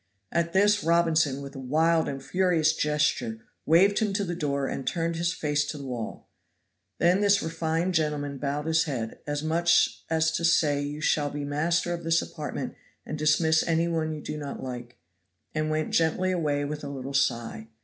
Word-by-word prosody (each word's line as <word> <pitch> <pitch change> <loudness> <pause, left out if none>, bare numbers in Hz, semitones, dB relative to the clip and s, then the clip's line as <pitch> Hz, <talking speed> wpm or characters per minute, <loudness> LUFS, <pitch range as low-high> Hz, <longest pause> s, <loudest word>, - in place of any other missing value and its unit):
At 170 0 0
this 205 +2 +4
Robinson, 160 -4 +2
with 140 +1 -9
a - - -6
wild 160 +5 +2
and 135 -1 -6
furious 175 -2 +2
gesture, 150 -7 0 0.3
waved 190 +6 +5
him 210 -3 0
to 200 +1 0
the 175 -2 -3
door 140 -5 -1
and 135 - -4
turned 165 0 -1
his 170 +1 0
face 150 -4 0
to 150 - -5
the 140 - -7
wall; 120 -4 -6 0.7
then 175 +3 +3
this 200 -1 +4
refined 165 +2 -1
gentleman 150 -3 -1
bowed 145 +2 -2
his 160 +1 +2
head, 120 -7 -4
as 145 0 -2
much 170 +2 +2
as 160 0 +2
to 165 - -2
say 150 -4 +3
you 145 +1 -5
shall 150 -1 +1
be 145 0 -4
master 165 +4 0
of 170 0 -5
this 165 0 +3
apartment 150 -2 -5 0.3
and 155 - -5
dismiss 160 +1 +3
any 165 0 +1
one 160 -2 -1
you 155 -1 -5
do 150 - -5
not 140 -2 -6
like, 120 -1 -7 0.6
and 155 0 -1
went 155 0 -1
gently 165 +3 +2
away 150 -5 0
with 150 +1 -5
a 140 - -5
little 135 0 -6
sigh. 115 -4 0
155 Hz, 190 wpm, -27 LUFS, 145-170 Hz, 0.7 s, waved